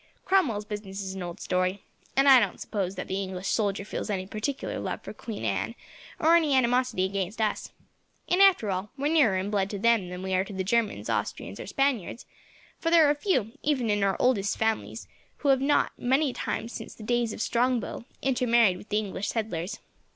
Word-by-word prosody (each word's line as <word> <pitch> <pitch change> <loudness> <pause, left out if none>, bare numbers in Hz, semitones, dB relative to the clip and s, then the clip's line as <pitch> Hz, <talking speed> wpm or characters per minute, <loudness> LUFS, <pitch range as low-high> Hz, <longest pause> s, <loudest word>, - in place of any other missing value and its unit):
Cromwell's 255 - +2
business 205 -2 -6
is 190 0 -5
an 190 - -6
old 175 +2 -6
story, 185 +2 -1 0.3
and 275 +1 +4
I 265 -2 +9
don't 210 -5 -1
suppose 195 -3 -3
that 185 - -5
the 190 +1 -2
English 190 -1 -5
soldier 200 -2 0
feels - - -5
any 190 -2 -2
particular 220 +8 -3
love - - -4
for - - -7
Queen 215 - -6
Anne, 105 - -1 0.4
or 325 +2 +5
any 310 -5 +3
animosity 250 -5 +2
against 195 +2 -3
us. 215 -2 -1 0.6
And 360 +2 +3
after 360 - +5
all, 190 +2 -3
we 285 +3 0
are - - +1
nearer 245 -12 +4
in 190 +2 -2
blood 200 -2 +1
to 205 - -4
them 225 -3 +2
than 180 +1 -6
we 190 0 -2
are 185 0 +3
to 200 - -9
the 190 0 -2
Germans, 225 +2 0
Austrians, - - -3
or - - -7
Spaniards, 265 - -1 0.5
for 330 - 0
there 330 -2 +6
are 290 - +4
few, 290 - 0
even 260 -7 +1
of 205 0 +1
our 195 -1 +1
oldest 205 -6 +2
families, 220 0 -2 0.3
who 285 - -1
have 265 -1 +4
not, 285 +2 +2
many 265 +2 +2
times 230 - -4
since - - -8
the 220 - -11
days 240 0 0
of - - -7
Strongbow, 240 +1 0 0.2
intermarried 240 -7 +3
with 205 - -13
the 210 - +1
English 205 -2 -3
settlers. 210 -3 -3
215 Hz, 205 wpm, -27 LUFS, 195-255 Hz, 0.6 s, I